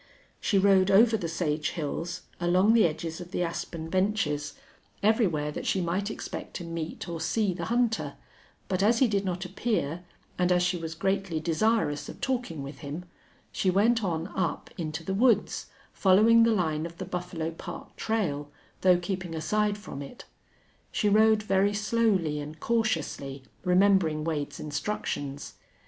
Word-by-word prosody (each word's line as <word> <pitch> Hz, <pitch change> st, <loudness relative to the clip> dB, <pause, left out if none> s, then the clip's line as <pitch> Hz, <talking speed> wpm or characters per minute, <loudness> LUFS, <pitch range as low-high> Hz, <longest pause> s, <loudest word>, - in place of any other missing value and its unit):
She 200 Hz, -, +1 dB
rode 195 Hz, -1 st, +5 dB
over 220 Hz, +4 st, +6 dB
the 180 Hz, -6 st, -2 dB
sage 155 Hz, -2 st, -1 dB
hills, 170 Hz, +2 st, -4 dB, 0.2 s
along 180 Hz, +5 st, +4 dB
the 225 Hz, -6 st, +6 dB
edges 160 Hz, +2 st, -5 dB
of 175 Hz, -, -9 dB
the 180 Hz, -, -1 dB
aspen 165 Hz, -1 st, -4 dB
benches, 165 Hz, -6 st, 0 dB, 0.5 s
everywhere 185 Hz, -9 st, +2 dB
that -, -, -5 dB
she 190 Hz, -, +2 dB
might 185 Hz, +4 st, -1 dB
expect -, -, -6 dB
to 175 Hz, -, -4 dB
meet 165 Hz, -1 st, -5 dB
or 170 Hz, -1 st, -4 dB
see 205 Hz, +3 st, +1 dB
the 175 Hz, -, -4 dB
hunter, 235 Hz, -1 st, 0 dB, 0.5 s
but 185 Hz, -1 st, 0 dB
as 225 Hz, +4 st, +4 dB
he 260 Hz, -, +4 dB
did 200 Hz, -3 st, 0 dB
not 180 Hz, 0 st, -2 dB
appear, 180 Hz, -4 st, -2 dB, 0.4 s
and 180 Hz, 0 st, +3 dB
as 180 Hz, 0 st, +4 dB
she 180 Hz, +1 st, +1 dB
was 165 Hz, -2 st, -5 dB
greatly 190 Hz, -1 st, -1 dB
desirous 165 Hz, -1 st, +1 dB
of -, -, -9 dB
talking 245 Hz, -, -2 dB
with 140 Hz, +2 st, -8 dB
him, 150 Hz, +5 st, -6 dB, 0.5 s
she 190 Hz, -, 0 dB
went 220 Hz, +5 st, +3 dB
on 170 Hz, -1 st, -2 dB
up 175 Hz, -7 st, -2 dB
into 155 Hz, -2 st, -4 dB
the 190 Hz, -, -2 dB
woods, 235 Hz, +4 st, +2 dB, 0.3 s
following 215 Hz, +4 st, +5 dB
the 230 Hz, 0 st, +5 dB
line 160 Hz, -6 st, 0 dB
of 170 Hz, 0 st, -14 dB
the 185 Hz, -, -5 dB
Buffalo 175 Hz, -3 st, -4 dB
Park 165 Hz, -, -9 dB
trail, 155 Hz, -11 st, -1 dB, 0.3 s
though 180 Hz, -1 st, +6 dB
keeping 180 Hz, -1 st, -4 dB
aside 210 Hz, +5 st, 0 dB
from 205 Hz, -9 st, -8 dB
it. 145 Hz, -, -10 dB, 0.7 s
She 210 Hz, -, +1 dB
rode 215 Hz, +1 st, +5 dB
very 200 Hz, 0 st, +2 dB
slowly 205 Hz, -8 st, +1 dB
and 150 Hz, +2 st, -7 dB
cautiously, 160 Hz, -, -1 dB, 0.2 s
remembering 180 Hz, -4 st, +3 dB
Wade's 150 Hz, -3 st, -3 dB
instructions. 145 Hz, -3 st, -4 dB
180 Hz, 160 wpm, -28 LUFS, 160-210 Hz, 0.7 s, over